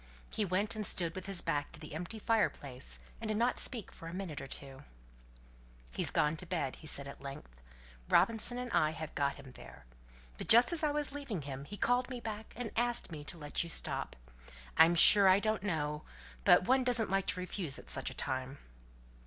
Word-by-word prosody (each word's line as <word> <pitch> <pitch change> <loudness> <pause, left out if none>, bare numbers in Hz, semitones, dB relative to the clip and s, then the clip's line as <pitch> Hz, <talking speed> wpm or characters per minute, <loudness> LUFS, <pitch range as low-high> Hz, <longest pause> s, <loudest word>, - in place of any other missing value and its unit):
He 215 - -1
went 200 +5 0
and 215 - -3
stood 170 -4 +1
with 185 0 -7
his 195 -3 -1
back 145 0 -2
to - - -6
the 155 -2 -10
empty 175 +7 -5
fireplace, 145 - -1 0.2
and 225 - -5
did 215 -1 -1
not 240 +2 +1
speak 230 -6 +3
for 165 - -11
a 165 - -6
minute 185 -6 -5
or 135 - -7
two. 135 0 -8 1.1
"He's 65 - +1
gone 150 +2 +1
to 180 - -3
bed," 160 -7 -2
said 140 -2 -1
he - - -7
at - - -15
length. 135 - -10 0.5
"Robinson 230 +2 +2
and 250 -1 -5
I 155 -6 +2
have 160 -1 -7
got 140 -1 0
him 135 -2 -12
there. - - -14 0.5
But - - -5
just 240 +6 +6
as 335 - 0
I 305 - +2
was 295 -1 -1
leaving 275 - -5
him 135 0 -7
he 205 +6 -9
called 245 +3 +1
me 250 -2 -5
back 220 -1 -7
and 240 -2 -5
asked 240 -4 0
me 150 -2 -7
to 170 - -3
let 150 0 -1
you 170 - -8
stop. - - -3 0.6
I'm 165 +2 +6
sure 200 +3 +9
I 185 +1 +6
don't 215 0 0
know 150 -6 -2 0.4
but - - +6
one 260 +1 +4
doesn't 235 -5 +1
like 195 0 0
to - - -1
refuse 180 -5 -3
at - - -13
such 135 - +1
a - - -10
time." 130 0 -3
185 Hz, 210 wpm, -33 LUFS, 150-225 Hz, 1.1 s, sure